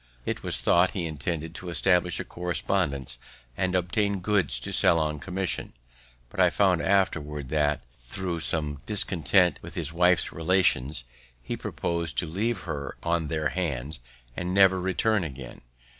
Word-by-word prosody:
It -, -, -2 dB
was -, -, -2 dB
thought 90 Hz, +2 st, +4 dB
he 85 Hz, -, -1 dB
intended 80 Hz, +1 st, -4 dB
to 90 Hz, 0 st, -7 dB
establish 90 Hz, 0 st, +2 dB
a -, -, -2 dB
correspondence, 90 Hz, -6 st, -2 dB, 0.4 s
and 95 Hz, +4 st, 0 dB
obtain 100 Hz, +3 st, 0 dB
goods 90 Hz, -10 st, +1 dB
to -, -, -3 dB
sell 85 Hz, -, +4 dB
on 75 Hz, -2 st, -1 dB
commission; 95 Hz, +3 st, -3 dB, 0.6 s
but -, -, -8 dB
I -, -, +6 dB
found 95 Hz, -4 st, +2 dB
afterwards, 75 Hz, -8 st, 0 dB
that, 75 Hz, -1 st, +1 dB, 0.2 s
thro' 85 Hz, +8 st, -4 dB
some 75 Hz, -3 st, -1 dB
discontent 95 Hz, -3 st, +3 dB
with -, -, -10 dB
his 80 Hz, -2 st, -2 dB
wife's 90 Hz, +1 st, +3 dB
relations, 80 Hz, -6 st, +1 dB, 0.4 s
he -, -, -3 dB
purposed 85 Hz, -2 st, -3 dB
to -, -, +1 dB
leave 100 Hz, +6 st, -2 dB
her 75 Hz, -5 st, -5 dB
on 85 Hz, -2 st, 0 dB
their 75 Hz, -1 st, -1 dB
hands, 75 Hz, -6 st, -3 dB, 0.4 s
and 90 Hz, +1 st, -3 dB
never 95 Hz, -2 st, +5 dB
return 95 Hz, +2 st, +1 dB
again. 65 Hz, -5 st, -8 dB
85 Hz, 150 wpm, -27 LUFS, 75-95 Hz, 0.6 s, I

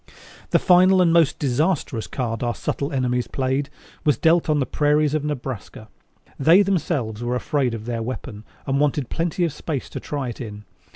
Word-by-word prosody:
The -, -, +4 dB
final 185 Hz, +1 st, +5 dB
and 170 Hz, -2 st, +4 dB
most 165 Hz, -4 st, +4 dB
disastrous 140 Hz, -3 st, 0 dB
card 115 Hz, -4 st, -3 dB
our 120 Hz, -1 st, -1 dB
subtle 140 Hz, +2 st, -3 dB
enemies 125 Hz, -2 st, 0 dB
played 135 Hz, +2 st, -1 dB, 0.3 s
was 150 Hz, -6 st, +2 dB
dealt 165 Hz, 0 st, +3 dB
on 150 Hz, -1 st, +3 dB
the 135 Hz, -, +1 dB
prairies 150 Hz, +1 st, +2 dB
in 150 Hz, -1 st, -1 dB
Nebraska. 125 Hz, -6 st, -6 dB, 0.5 s
They 165 Hz, +8 st, +6 dB
themselves 145 Hz, -, -1 dB
were 120 Hz, +1 st, -1 dB
afraid 125 Hz, -1 st, 0 dB
of 110 Hz, -1 st, -8 dB
their 115 Hz, -1 st, -3 dB
weapon 115 Hz, -2 st, -6 dB, 0.2 s
and 135 Hz, 0 st, 0 dB
wanted 145 Hz, -3 st, 0 dB
plenty 170 Hz, +2 st, -1 dB
of 160 Hz, -, -3 dB
space 150 Hz, -5 st, -5 dB
to -, -, -5 dB
try 140 Hz, -4 st, -4 dB
it 120 Hz, -, -7 dB
in. 105 Hz, -3 st, -7 dB
140 Hz, 180 wpm, -22 LUFS, 120-155 Hz, 0.5 s, They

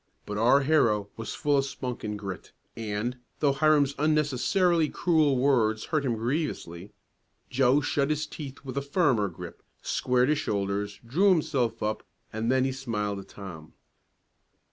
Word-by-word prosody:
But 105 Hz, 0 st, -4 dB
our 125 Hz, +5 st, +5 dB
hero 115 Hz, -9 st, +2 dB
was 115 Hz, -, -6 dB
full 145 Hz, -1 st, +2 dB
of 135 Hz, -, 0 dB
spunk 125 Hz, -3 st, -5 dB
and 105 Hz, 0 st, -3 dB
grit, 95 Hz, -3 st, -7 dB, 0.2 s
and, 115 Hz, +3 st, -3 dB, 0.2 s
though 145 Hz, -2 st, +3 dB
Hiram's 145 Hz, 0 st, +3 dB
unnecessarily 155 Hz, +3 st, +2 dB
cruel 155 Hz, -6 st, +2 dB
words 115 Hz, -5 st, +2 dB
hurt 155 Hz, -3 st, -1 dB
him 120 Hz, -3 st, 0 dB
grievously, 110 Hz, -, -3 dB, 0.6 s
Joe 135 Hz, +2 st, +3 dB
shut 140 Hz, 0 st, 0 dB
his 155 Hz, 0 st, 0 dB
teeth 140 Hz, -2 st, -9 dB
with 130 Hz, +1 st, -6 dB
a -, -, +1 dB
firmer 140 Hz, -, +2 dB
grip, 85 Hz, -, -10 dB, 0.2 s
squared 125 Hz, +1 st, +1 dB
his 150 Hz, -1 st, +2 dB
shoulders, 100 Hz, 0 st, -2 dB
drew 175 Hz, +13 st, +3 dB
himself 140 Hz, -, +1 dB
up, 110 Hz, 0 st, -1 dB, 0.3 s
and 110 Hz, +2 st, -1 dB
then 130 Hz, 0 st, +3 dB
he 135 Hz, -, 0 dB
smiled 105 Hz, -6 st, -3 dB
at 95 Hz, -, -11 dB
Tom. 85 Hz, -6 st, -10 dB
130 Hz, 155 wpm, -27 LUFS, 105-145 Hz, 0.6 s, our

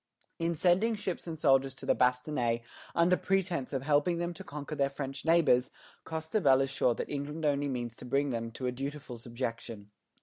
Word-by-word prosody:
In 165 Hz, 0 st, 0 dB
sending 190 Hz, +8 st, +3 dB
ships 190 Hz, -4 st, -4 dB
and 160 Hz, -1 st, -4 dB
soldiers 135 Hz, -3 st, +3 dB
to -, -, -9 dB
the -, -, +4 dB
"Bastonnais" 125 Hz, -2 st, +1 dB, 0.3 s
under 170 Hz, +2 st, +4 dB
pretence 180 Hz, -8 st, 0 dB
of 135 Hz, -2 st, -2 dB
helping 150 Hz, +4 st, +2 dB
them 175 Hz, +1 st, -2 dB
to 165 Hz, -, -9 dB
conquer 150 Hz, +1 st, -7 dB
their 140 Hz, -2 st, +1 dB
French 135 Hz, 0 st, -5 dB
neighbors, 160 Hz, -7 st, +4 dB, 0.4 s
Costebelle 160 Hz, -4 st, +2 dB
is 135 Hz, -, -3 dB
sure 125 Hz, -4 st, +2 dB
that -, -, -4 dB
England 150 Hz, +2 st, -3 dB
only 145 Hz, -1 st, +2 dB
means 120 Hz, -4 st, -3 dB
to -, -, -10 dB
bring 140 Hz, +3 st, +1 dB
them 115 Hz, -1 st, -2 dB
to 130 Hz, -, -5 dB
a 125 Hz, -, +1 dB
dutiful 135 Hz, -1 st, -6 dB
subjection. 115 Hz, -3 st, -5 dB
140 Hz, 190 wpm, -31 LUFS, 125-160 Hz, 0.4 s, the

